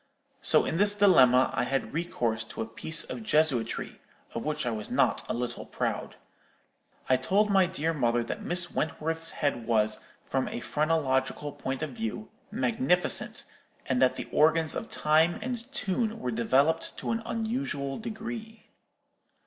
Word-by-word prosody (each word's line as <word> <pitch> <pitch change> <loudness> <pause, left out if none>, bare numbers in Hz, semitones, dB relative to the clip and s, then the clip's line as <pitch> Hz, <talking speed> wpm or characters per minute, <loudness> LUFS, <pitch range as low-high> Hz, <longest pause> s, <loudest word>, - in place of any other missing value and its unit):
So, - - +5
in 165 - -1
this 205 +2 +4
dilemma, 130 -11 +5
I 125 - 0
had 135 +2 -2
recourse 120 -9 -1
to 115 - -5
a - - -7
piece 155 +8 +1
of - - -6
jesuitry, 150 - 0 0.3
of 115 - -4
which 150 -3 -2
I 120 - 0
was 105 -2 -5
not - - +2
a - - 0
little 120 0 -3
proud. - - -3 0.9
I 130 - +4
told 200 +10 +2
my 190 -2 +5
dear 165 -2 -1
mother 120 -5 +1
that 115 - -5
Miss 175 0 0
Wentworth's 160 +2 -1
head 140 -6 -2
was, 110 -2 +2 0.3
from 135 -1 -1
a - - -4
phrenological 145 -1 0
point 135 +1 -4
of 155 - -4
view, 225 -2 -5 0.2
magnificent, 225 -4 0 0.4
and 130 -1 0
that 130 -1 +4
the - - -6
organs 160 +1 +3
of - - -5
time 160 +3 +3
and 245 +2 -5
tune 225 -2 -1
were 125 - -2
developed 135 +8 +1
to - - -3
an 230 0 -1
unusual 220 - -3
degree. 225 0 -7
155 Hz, 155 wpm, -28 LUFS, 130-205 Hz, 0.9 s, So